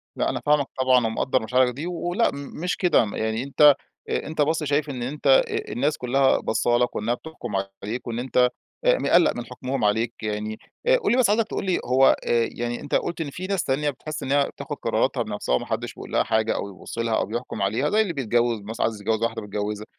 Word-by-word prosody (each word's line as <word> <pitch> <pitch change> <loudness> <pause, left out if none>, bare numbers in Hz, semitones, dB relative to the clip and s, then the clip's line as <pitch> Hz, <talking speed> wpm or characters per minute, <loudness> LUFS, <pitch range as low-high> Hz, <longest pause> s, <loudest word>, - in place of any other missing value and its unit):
لا، - - 0
أنا - - -3
فاهمَك 145 -2 +3
طبعًا، 130 -2 +4
ومقدِّر 130 +3 0
مشاعرَك 125 +2 +2
دي. 150 +7 -5
ولأ 175 +5 0
مش 145 +5 -4
كده، 180 -3 +3
يعني 110 +2 -1
أنتَ 145 +1 +6 0.3
أنتَ 155 0 -2
بس 160 +2 +1
شايِف 145 +1 0
إن 125 -3 -4
أنتَ 145 +4 -4
آآ، 445 -4 +3
الناس 150 +1 0
كلها 130 +2 +2
بصَّالك 120 +2 +1
وإنها 110 +3 0
بتحكُم 120 -5 -8 0.3
عليك، 115 +5 -4
وإن 120 0 -3
أنتَ 125 0 +2 0.4
مقلِق - - +4
من 120 - -5
حكمهم 130 0 -4
عليك 110 +3 +1
يعني. 105 0 -3 0.3
آآ، - - +6
قل 455 -4 0
لي 245 - +3
بس، 255 -5 +4
عايزَك 220 +1 +2
تقول - - -4
لي، 185 - +1
هو 130 +2 +5
آآ 115 -1 +2
يعني 120 0 -4
أنتَ 145 - -2
قُلت 170 -1 -1
إن 150 - -3
في 185 +6 -6
ناس 195 -4 0
تانية 145 +3 0
بتحِس 150 +2 -6
إنها 140 +1 +2
بتاخُد - - -7
قراراتها - - 0
بنفسها 65 - -1
وما - - -2
حدِّش - - -3
بيقولها - - -1
حاجة، 110 0 +1
أو 100 - -3
يبُصّ 95 - -10
لها، 115 -1 +1
أو - - +1
بيحكُم 115 0 -5
عليها، 110 +9 +1
زي 215 +1 +3
اللي 185 -6 -1
بيتجوِّز 120 -3 +1
مثلًا، 110 +2 -3
عايِز 110 -2 -3
يتجوِّز 110 +1 0
واحدة 115 -1 -1
بيتجوِّزها. 105 0 -4
130 Hz, 210 wpm, -24 LUFS, 115-155 Hz, 0.4 s, أنتَ